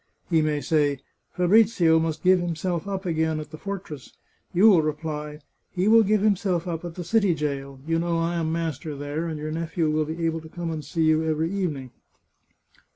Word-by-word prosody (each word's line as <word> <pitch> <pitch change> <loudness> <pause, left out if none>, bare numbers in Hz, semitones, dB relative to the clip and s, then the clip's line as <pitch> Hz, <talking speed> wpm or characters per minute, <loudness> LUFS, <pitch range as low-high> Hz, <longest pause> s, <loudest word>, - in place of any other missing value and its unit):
" - - -41
He 165 -1 +4
may 150 -1 0
say, 145 -4 +1 0.2
* - - -50
Fabrizio 180 -3 +4
must 160 -1 -2
give 185 0 +5
himself 175 +1 -2
up 195 -1 -4
again 160 -2 0
at 150 -1 -8
the 155 - -8
fortress.' 185 -9 -7 0.3
You 190 +4 +5
will 190 -7 +6
reply, 150 -1 -4
' - - -48
He 185 +2 +1
will 225 +1 +7
give 210 -1 +2
himself 190 -4 +1
up 165 -1 -4
at 170 -1 -7
the 180 - -5
city 200 -1 +2
jail 140 -3 -4
' - - -20
(you 165 0 +1
know 170 0 0
I 165 +1 0
am 160 -1 -1
master 160 -2 -3
there, 145 +4 -4
and 160 -2 -4
your 155 +1 -5
nephew 165 0 -1
will 155 0 +1
be 165 +2 -3
able 165 0 -1
to 160 - -12
come 170 0 -4
and 155 -2 -4
see 160 +4 -1
you 155 0 +3
every 160 +1 0
evening). 150 -10 -3
165 Hz, 220 wpm, -25 LUFS, 155-180 Hz, 0.3 s, will